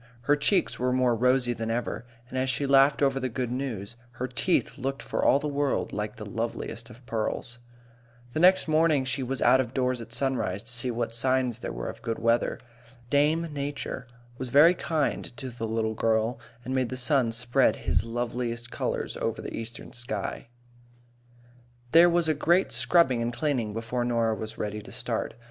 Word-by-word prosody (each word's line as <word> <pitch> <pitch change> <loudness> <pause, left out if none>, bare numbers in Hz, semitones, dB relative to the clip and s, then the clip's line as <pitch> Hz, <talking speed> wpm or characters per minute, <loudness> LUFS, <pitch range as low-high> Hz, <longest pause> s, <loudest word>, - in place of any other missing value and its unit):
Her 145 +5 +3
cheeks 175 +6 +1
were 125 0 +1
more 125 -1 +3
rosy 125 +1 +2
than 115 -1 -4
ever, 120 +1 -3 0.2
and 125 - -9
as 130 0 0
she 140 +2 0
laughed 140 +1 +5
over 135 -1 +2
the 130 -1 -2
good 125 0 -3
news, 120 -4 -4 0.2
her 120 +1 -3
teeth 145 +4 0
looked 135 +1 -3
for - - -2
all - - +5
the 150 - -3
world 145 -1 -1
like 105 0 -3
the 110 - -8
loveliest 115 +2 -4
of 125 +1 -15
pearls. 120 +2 -3 0.7
The - - -1
next 185 +2 +5
morning 155 -3 +3
she 130 +1 -1
was 130 +1 -2
out 130 - +6
of 120 -1 -6
doors 125 -2 0
at 115 0 -10
sunrise, 120 -7 -1
to 115 - -4
see 120 +1 +1
what 115 -1 -2
signs 125 0 +2
there - - -5
were - - -5
of - - -7
good 115 -1 -3
weather. 115 +1 +1 0.5
Dame 155 +3 +2
Nature 140 -3 -4 0.3
was 130 - -4
very 150 +7 +7
kind 160 -4 -1
to 130 -2 -6
the 115 -1 -4
little 110 0 -1
girl, 110 +2 +1 0.3
and 130 - -3
made 130 -2 +1
the 130 - -4
sun 130 -2 +2
spread 120 +1 +2
his - - 0
loveliest 120 0 -3
colours - - -2
over - - -2
the - - -6
eastern 115 0 -6
sky. 115 -4 -4 1.4
There 170 +2 +8
was 170 -1 +2
a 155 - +3
great 170 +5 +2
scrubbing 135 -9 +3
and 115 +1 -1
cleaning 120 -3 -1
before 115 +3 -2
Norah 115 -2 +1
was 110 0 -6
ready 105 0 -3
to - - -12
start. - - -3
125 Hz, 190 wpm, -27 LUFS, 115-140 Hz, 1.4 s, There